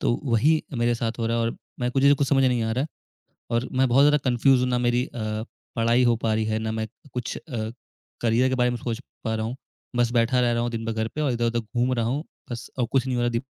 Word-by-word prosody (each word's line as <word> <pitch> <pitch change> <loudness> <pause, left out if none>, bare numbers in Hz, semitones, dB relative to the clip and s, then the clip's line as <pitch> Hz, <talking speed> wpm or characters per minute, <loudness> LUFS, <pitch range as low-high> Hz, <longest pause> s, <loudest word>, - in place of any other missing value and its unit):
तो - - +2
वही 140 +6 +3
मेरे 120 0 +2
साथ 115 0 -3
हो 115 - 0
रहा 115 +1 0
है 115 - +1
और 115 - +1 0.3
मैं 125 - +1
मुझे 140 +1 +6
कुछ 140 -1 0
समझ 135 -2 +4
नहीं 125 -2 +2
आ 110 0 0
रहा 130 +4 0
है 155 - -3 0.6
और 120 +1 0
मैं 130 - +5
बहुत 135 +4 +5
ज़्यादा 150 0 +5
कन्फ्यूज़्ड 125 +1 +4
हूँ 125 - +1
ना 125 - +2
मेरी 120 0 +2
अ, 110 -1 -4 0.3
पढ़ाई 115 +2 +3
हो 120 -1 +4
पा 110 - +1
रही 110 0 +1
है, 110 0 0
ना 110 0 -2
मैं 110 0 -2 0.3
कुछ 125 -1 -3
अ, 115 -7 -5 0.5
करिअर 120 +3 +3
के 130 - 0
बारे 125 -1 +2
में 120 - -2
सोच 115 +1 -3 0.2
पा 110 - 0
रहा 110 0 -1
हूँ, 120 +3 -4 0.4
बस 120 -1 +3
बैठा 120 +1 +3
रह 120 -1 +2
रहा 120 - +1
हूँ 120 - -1
दिन 115 -1 -4
भर 115 - -1
घर 110 0 -1
पे 155 - -3
और 145 -4 +1
इधर-उधर 120 0 0
घूम 120 +3 -1
रहा 115 - 0
हूँ 140 +7 -1 0.3
बस 120 -1 -6
और 120 - +2
कुछ 135 -1 +2
नहीं 125 -1 -1
हो 120 - +1
रहा 120 - +2
दिम 115 +2 -1
120 Hz, 280 wpm, -25 LUFS, 115-125 Hz, 0.6 s, मुझे